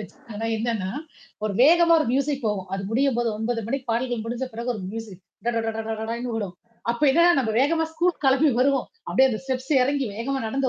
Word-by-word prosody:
வச்சிட்டாங்க 225 -4 -8
என்னன்னா, 220 -4 -2 0.5
ஒரு 215 - -1
வேகமா 335 +5 +6
ஒரு 305 - 0
மியூசிக் 275 0 0
போகும். 200 -4 -2
அது 195 - -3
முடியும்போது 240 -1 +1
9 230 +1 -2
மணிக்கு 275 +2 -3
பாடல்கள் 240 -1 -1
முடிஞ்ச 240 +3 -3
பிறகு 235 +2 -4
ஒரு 215 - -6
மியூசிக். 215 -4 -7 0.3
ட 240 - +2
டட 225 0 0
ட 225 - -2 0.2
டடன்னு 235 +2 -3
வோம். 200 -5 -3 0.4
அப்ப 235 - -8
என்னன்னா 340 +5 +5
நம்ம 225 -4 0
வேகமா 320 +4 +2
ஸ்கூல் 345 +2 +1
கிளம்பி 270 +3 +4
வருவோம். 270 0 +2 0.2
அப்டியியே 265 0 +4
அந்த 220 - -3
ஸ்டெப்ஸ் 260 +1 -3
எறங்கி 275 +1 0
வேகமா 260 +6 -2
நடந்து 265 +4 0
245 Hz, 190 wpm, -24 LUFS, 225-275 Hz, 0.5 s, வேகமா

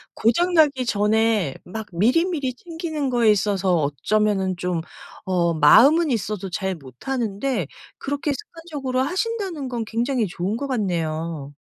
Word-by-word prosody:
고장 345 +11 +2
나기 290 -6 +4
전에 215 - +1
막 220 +4 -6
미리미리 265 - +1
챙기는 320 -2 -4
거에 235 -3 +4
있어서 195 -2 +1
어쩌면은 190 - 0
좀 175 -1 -2 0.4
어 175 -3 +1
마음은 270 - +6
있어도 210 -3 -2
잘 190 +1 -2
못하는 200 - -4
데 245 - -1 0.3
그렇게 285 +1 -2
습관적으로 295 -7 -4
하신다는 365 - -2
건 235 -2 -3
굉장히 235 +2 0
좋은 185 +5 -3
것 280 - -4
같네요. 165 - -2
225 Hz, 300 characters per minute, -23 LUFS, 185-280 Hz, 0.4 s, 마음은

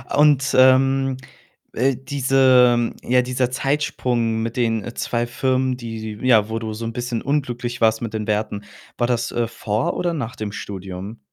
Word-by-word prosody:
Und, 145 -2 +4
ähm, 135 0 +4 0.6
äh, 130 +2 +1
diese 130 -3 +3
ja, 125 +1 +3
dieser 125 0 -1
Zeitsprung 125 -4 -1
mit 115 +2 -4
den, 115 -3 +1
äh, 120 - -7
2 120 0 -2
Firmen, 130 +1 0
die 110 -3 -6
die 130 - -3
ja, 110 -4 +4
wo 110 0 -2
du 110 -1 -5
so 115 +2 -6
'n 115 - -4
bisschen 120 -1 -3
unglücklich 125 -4 -2
warst 110 0 +3
mit 115 -2 -4
den 110 -1 -3
Werten, 105 -1 -2 0.3
war 120 - +1
das, 120 -1 -1
äh, 120 -1 -1
vor 110 0 -2
oder 175 -1 -1
nach 125 -7 -4
dem 105 -1 -5
Studium? 95 +2 -7
120 Hz, 175 wpm, -21 LUFS, 110-130 Hz, 0.6 s, Und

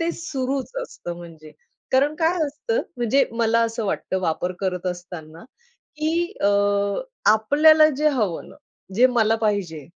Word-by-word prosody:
ते 335 0 0
सुरूच 270 -6 -3
असतं 175 - -8
म्हणजे. 160 -3 -12 0.4
कारण 280 +3 +3
काय 330 +2 +1
असतं, 460 - -2 0.2
म्हणजे 245 +3 +2
मला 230 0 +2
असं 230 0 -3
वाटतं 190 -1 -2
वापर 180 +1 -1
करत 185 -2 -2
असताना 175 -3 -7 0.5
की 335 +4 -1
अ, 200 - +4 0.8
आपल्याला 305 +8 +5
जे 305 +2 +3
हवं 215 - -2
ना, - - -15 0.4
जे 245 +4 +6
मला 225 -3 +2
पाहिजे. 200 -9 -2
230 Hz, 140 wpm, -22 LUFS, 180-295 Hz, 0.8 s, जे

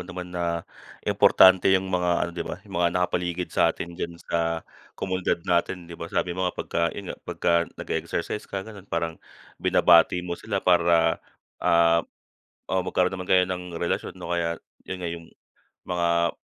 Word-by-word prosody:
naman 90 0 -7
na 85 -1 -2 0.4
importante 95 0 +6
yung 95 0 +2
mga 90 -1 +1
ano 85 - -4
'di 85 - -6
ba - - -4
yung - - -12
mga 85 - +4
nakapaligid 90 0 -1
sa - - +4
atin 85 - -4
diyan 85 0 -5
sa 85 -1 -2 0.3
komunidad 95 -3 -1
natin 90 0 0
'di 85 - -11
ba? 85 - -5
Sabi 90 - -1
mo 90 +1 0
nga - - -8
pagka 85 - -2
yun 100 - -5
nga, - - -11
pagka 85 - 0 0.2
nag-e-exercise 105 +5 -3
ka 95 -1 -4
ganon, 100 -3 -12
parang 80 -1 -2 0.4
binabati 90 +1 +5
mo 90 - -4
sila 100 +2 -3
para, 85 -2 +4 0.4
ah, 85 0 +4 0.7
oh, 95 0 0
magkaroon 90 +1 +1
naman 90 -1 -6
kayo 95 -1 +6
ng 90 -2 -5
relasyon 85 - -2
'no? 85 - -4
Kaya 85 -1 -1 0.3
yun 95 - -3
nga 90 -2 -4
yung 85 -1 -9 0.6
mga 85 -1 +1
90 Hz, 170 wpm, -25 LUFS, 85-90 Hz, 0.7 s, importante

